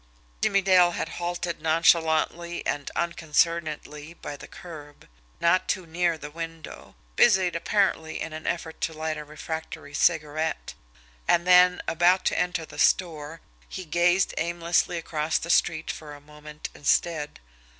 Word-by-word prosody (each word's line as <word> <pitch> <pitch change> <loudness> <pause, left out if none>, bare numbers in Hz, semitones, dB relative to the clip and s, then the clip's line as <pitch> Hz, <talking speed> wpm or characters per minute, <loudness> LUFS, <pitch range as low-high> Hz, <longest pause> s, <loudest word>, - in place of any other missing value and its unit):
Jimmie 200 -1 +2
Dale 180 -2 +5
had - - -3
halted 175 -1 -3
nonchalantly 165 +1 +2
and 145 -1 -2
unconcernedly 160 -2 -1
by 145 - -7
the - - -11
curb, 155 -6 -12 0.3
not 170 +2 +2
too 185 -3 -1
near 170 0 0
the 150 -1 -9
window, 165 0 -8 0.2
busied 185 -2 +4
apparently 170 -3 0
in 165 - -5
an 155 0 -7
effort 165 -2 -3
to 160 - -1
light 155 0 -3
a 150 - -6
refractory 150 -1 -7
cigarette; 155 - 0 0.5
and 170 0 +3
then, 180 0 +6
about 175 +3 +3
to - - +1
enter 180 -2 -1
the - - -11
store, 165 -3 +1 0.3
he 185 - -6
gazed 175 +3 +2
aimlessly 170 +1 0
across 155 -1 -1
the 170 - -2
street 160 -2 +2
for 150 -2 -9
a - - -13
moment 150 +1 -10
instead. 150 +1 0
165 Hz, 140 wpm, -26 LUFS, 155-175 Hz, 0.5 s, then